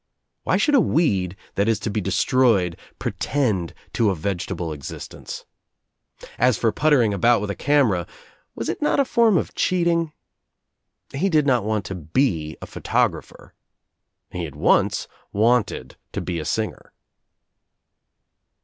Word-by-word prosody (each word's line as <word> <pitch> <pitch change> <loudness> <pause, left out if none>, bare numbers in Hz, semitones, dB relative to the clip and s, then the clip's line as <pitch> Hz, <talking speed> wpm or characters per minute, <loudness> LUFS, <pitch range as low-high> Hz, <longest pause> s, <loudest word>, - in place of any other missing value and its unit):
Why - - +2
should 295 - +2
a 275 - +6
weed 95 - +1 0.2
that 100 +2 +1
is 115 -1 +3
to 110 - -2
be 105 - -1
destroyed 95 -2 +2 0.2
pretend 115 - -1 0.2
to 115 -3 +2
a 95 - 0
vegetable 85 -1 -3
existence? 70 -2 -8 0.9
As 125 -1 +4
for 115 - +2
puttering 135 -8 +3
about 115 +5 +4
with 105 0 -3
a - - -5
camera 120 -12 +2 0.2
— - - -36
was 115 - -4
it - - -3
not 300 - +2
a 280 - +4
form 230 -6 +4
of - - -2
cheating? 170 -3 +1 1.0
He 180 +9 0
did 155 -4 +3
not 125 -6 +2
want 105 -3 -1
to 95 - -5
be 80 - -1
a - - -4
photographer. - - -2 0.8
He 90 -2 -3
had 75 -4 -9
once - - +2 0.2
wanted 110 - +1 0.2
to - - -2
be 85 -2 -3
a 75 - -5
singer. 110 +6 -3
110 Hz, 145 wpm, -23 LUFS, 90-140 Hz, 1.0 s, a